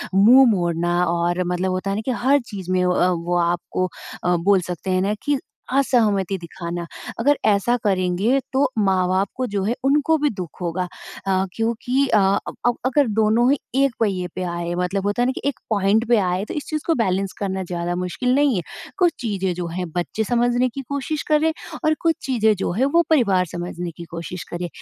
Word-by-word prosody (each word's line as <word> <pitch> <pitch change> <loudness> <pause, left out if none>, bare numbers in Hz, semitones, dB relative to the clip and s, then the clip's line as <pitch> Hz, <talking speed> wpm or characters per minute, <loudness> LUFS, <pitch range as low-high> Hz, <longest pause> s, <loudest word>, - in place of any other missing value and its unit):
मुँह 245 +7 +7
मोड़ना। 175 -3 0 0.2
और 175 +1 0
मतलब 180 +1 -1
होता 185 +2 -2
है 195 - 0
ना 215 - -2
कि 260 - 0
हर 280 +2 +5
चीज़ 190 -3 -5
में 185 0 +2
अ, - - +2 0.2
वो 175 +1 -1
आपको 175 +1 0 0.4
अ, 180 0 +2
बोल 190 +2 +3
सकते 180 +2 -4
हैं 185 - +2
ना 200 +2 +1
कि 290 -2 +1 0.3
असहमति 210 -8 +2
दिखाना। 170 0 -6 0.3
अगर 285 +4 +3
ऐसा 210 +3 +3
करेंगे 195 +5 +1
तो 275 +1 +3
माँ-बाप 190 -1 +2
को 255 - -1
जो 200 -1 -2
है 225 +5 0
उनको 300 +3 +3
भी 295 0 +1
दुःख 185 - -7
होगा 180 +1 -2 0.4
अ, 190 0 +2
क्योंकि 235 +4 0
अ, 215 - +4 0.3
अब - - -6
अब 240 -1 +2
अगर 265 0 +3
दोनों 225 +4 +3
ही 285 - +3 0.3
एक 275 -3 +2
पहिए 190 -5 0
पे 185 - -3
आए 170 0 -3
मतलब 190 +2 -1
होता 205 +4 0
है - - +3
ना 255 - +2
कि - - -6
एक 280 - -7
पॉइंट 215 +2 +2
पे 240 -2 +4
आए 185 0 0
तो - - -6
इस 295 - -4
चीज़ 305 -1 -2
को 330 - +4
बैलेंस 195 -4 0
करना 190 -1 -2
ज़्यादा 175 0 -3
मुश्किल 180 +8 -1
नहीं 285 -5 +3
है। 180 - 0 0.4
कुछ 355 -3 +3
चीज़ें 195 -6 -1
जो 175 -1 -4
हैं 180 +1 -4
बच्चे 180 +6 -2
समझने 245 +2 +2
की 275 +4 -6
कोशिश 280 +2 -2
करें 310 +1 +3 0.3
और 310 - +4
कुछ 330 -1 +2
चीज़ें 220 -5 +3
जो 185 - -2
है 240 +9 +1
वो 340 - +7
परिवार 200 -12 +3
समझने 175 0 -4
की 170 - -7
कोशिश 170 +1 -6
करें। 175 0 -3
195 Hz, 205 wpm, -22 LUFS, 180-245 Hz, 0.4 s, मुँह